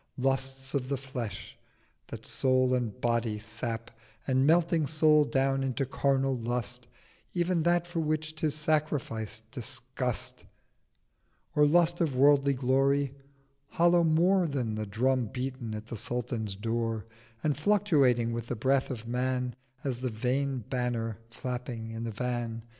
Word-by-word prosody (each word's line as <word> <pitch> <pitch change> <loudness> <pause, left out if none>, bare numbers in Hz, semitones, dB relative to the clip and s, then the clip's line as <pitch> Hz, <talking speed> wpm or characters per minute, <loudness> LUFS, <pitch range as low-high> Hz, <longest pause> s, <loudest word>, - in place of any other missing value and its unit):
Lusts 135 +1 -1
of 135 -2 -1
the 140 - 0
Flesh 125 -6 -6 0.5
that - - -8
Soul 130 -1 +2
and 125 -2 -1
Body 115 -3 0
sap, 115 +2 -4 0.3
And, 130 +1 +3
melting 165 -1 +3
Soul 155 -1 +4
down 135 -1 +1
into 135 +1 -1
carnal 135 0 +1
Lust, 120 +1 -3 0.5
Ev'n 175 -1 +1
that 175 +1 +2
for 175 -1 -3
which 155 0 -1
'tis 155 -2 -1
sacrificed 145 -8 -1
disgust: 125 -1 -4 1.1
Or 150 0 +6
Lust 170 +2 +3
of 155 -6 +1
worldly 140 +1 +5
Glory—hollow 140 +5 +1
more 175 +3 +4
Than 130 -7 -2
the 110 0 -3
Drum 125 +4 +1
beaten 125 -2 -4
at 105 0 -6
the 115 0 -6
Sultan's 115 -3 -3
Door, 115 +1 -2 0.4
And 150 -2 +2
fluctuating 145 - +3
with 115 0 -4
the 125 - -2
Breath 130 +4 +2
of 120 -4 -6
Man 125 0 -1 0.3
880 - - -5
As 125 -1 -3
the 130 - -1
Vain 130 +4 -1
Banner 120 -4 -2
flapping 120 -1 -5
in 115 +1 -4
the 115 - -3
Van. 120 0 -3
130 Hz, 140 wpm, -29 LUFS, 120-145 Hz, 1.1 s, Or